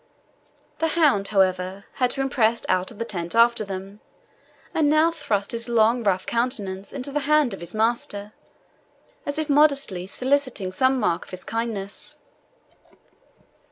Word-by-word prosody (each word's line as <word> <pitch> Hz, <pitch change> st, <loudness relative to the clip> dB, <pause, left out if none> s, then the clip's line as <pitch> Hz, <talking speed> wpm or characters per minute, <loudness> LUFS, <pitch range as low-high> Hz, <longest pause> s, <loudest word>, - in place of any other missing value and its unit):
The 325 Hz, -, +2 dB
hound, 270 Hz, -12 st, +3 dB
however, 190 Hz, -1 st, 0 dB
had 250 Hz, -2 st, 0 dB, 0.2 s
pressed 230 Hz, -2 st, +2 dB
out 185 Hz, 0 st, +1 dB
of 225 Hz, -, -12 dB
the 230 Hz, -, -3 dB
tent 175 Hz, -3 st, -4 dB
after 235 Hz, -1 st, +4 dB
them, 195 Hz, +1 st, -7 dB, 0.7 s
and 305 Hz, -2 st, +2 dB
now 310 Hz, +2 st, +4 dB
thrust 215 Hz, -11 st, -2 dB
his 235 Hz, +1 st, -3 dB
long, 235 Hz, +1 st, +3 dB
rough 190 Hz, -3 st, +1 dB
countenance 205 Hz, -5 st, -2 dB
into 275 Hz, 0 st, -2 dB
the 295 Hz, -, 0 dB
hand 300 Hz, -6 st, +4 dB
of 195 Hz, -, -7 dB
his 170 Hz, +4 st, -6 dB
master, 215 Hz, -2 st, -1 dB, 0.9 s
as 285 Hz, +1 st, -1 dB
if 310 Hz, -1 st, -1 dB
modestly 275 Hz, -, +3 dB
soliciting 255 Hz, -5 st, -1 dB
some 260 Hz, +6 st, +2 dB
mark 170 Hz, -, 0 dB
of -, -, -17 dB
his 185 Hz, 0 st, -7 dB
kindness. 225 Hz, -4 st, -3 dB
230 Hz, 145 wpm, -24 LUFS, 195-270 Hz, 0.9 s, after